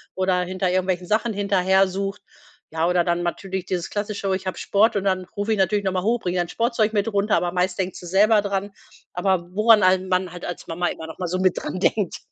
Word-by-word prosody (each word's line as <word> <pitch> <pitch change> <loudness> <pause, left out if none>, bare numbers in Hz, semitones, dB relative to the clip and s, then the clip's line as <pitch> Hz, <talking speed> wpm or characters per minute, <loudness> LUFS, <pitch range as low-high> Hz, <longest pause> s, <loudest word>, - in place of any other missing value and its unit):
oder 185 -1 +1
hinter 185 +1 -1
irgendwelchen 185 -1 -1
Sachen 220 +3 +1
hinterher 195 -1 +2
sucht. 195 +2 -4 0.5
Ja, 160 +1 0
oder 180 0 +2
dann 175 0 0
natürlich 190 +1 -3
dieses 180 -2 -3
klassische: 205 -2 -2
„Ich 190 - -6
habe 185 - -3
Sport.“ 215 +3 +2
Und 200 - 0
dann 185 -1 0
rufe 205 +2 -2
ich - - -1
natürlich 200 +2 +1
noch 190 - +1
mal 185 -1 -1
hoch: 235 +3 +1
„Bring 180 -3 -3
dein 175 -1 -1
Sportzeug 230 0 0
mit 210 +1 0
runter“, 205 +1 +1
aber 175 - -1
meist 180 +1 0
denkt 185 -1 -2
sie - - -10
selber 210 +4 +4
dran, 200 0 -3 0.4
aber 180 -1 0
woran 215 +2 +5
an 185 0 +3
man 185 -1 0
halt 175 0 -8
als 175 - -6
Mama 175 +2 -1
immer 160 - -5
noch 160 - -10
mal 180 - -2
so 185 +2 -2
mit 185 -1 +2
dran 185 - -4
denkt. 200 -1 0
190 Hz, 235 wpm, -23 LUFS, 180-205 Hz, 0.5 s, woran